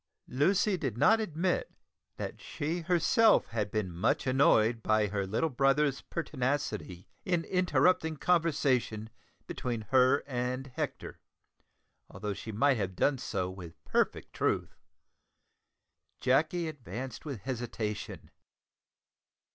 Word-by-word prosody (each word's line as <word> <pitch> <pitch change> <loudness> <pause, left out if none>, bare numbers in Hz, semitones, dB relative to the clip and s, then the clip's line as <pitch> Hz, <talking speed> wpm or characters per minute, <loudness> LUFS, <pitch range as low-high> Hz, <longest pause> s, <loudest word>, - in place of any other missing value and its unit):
Lucy 185 +9 +2
did 120 -9 -3
not 220 - +5
admit 180 -3 -1 0.5
that - - -6
she 160 +4 -3
herself 180 +6 +4
had 110 -3 -2
been 105 -4 -2
much 85 +2 0
annoyed 120 -4 +3
by 110 -1 +2
her 100 -1 -2
little 110 +11 0
brother's 135 +2 +2
pertinacity 130 - -3 0.2
in 175 -3 0
interrupting 180 -3 +2
conversation 140 -10 +1 0.3
between 120 -3 -3
her 130 +2 +4
and 130 0 -2
Hector, - - -5 0.9
although 105 -1 -4
she 110 - -7
might 130 +5 +3
have 95 -3 -3
done 135 +5 +1
so 95 -7 -2
with 90 -3 -11
perfect - - 0
truth. - - -1 1.4
Jacky 155 +6 +2
advanced 130 - -7
with 140 -9 -6
hesitation. 115 -3 -5
130 Hz, 110 wpm, -30 LUFS, 110-160 Hz, 1.4 s, not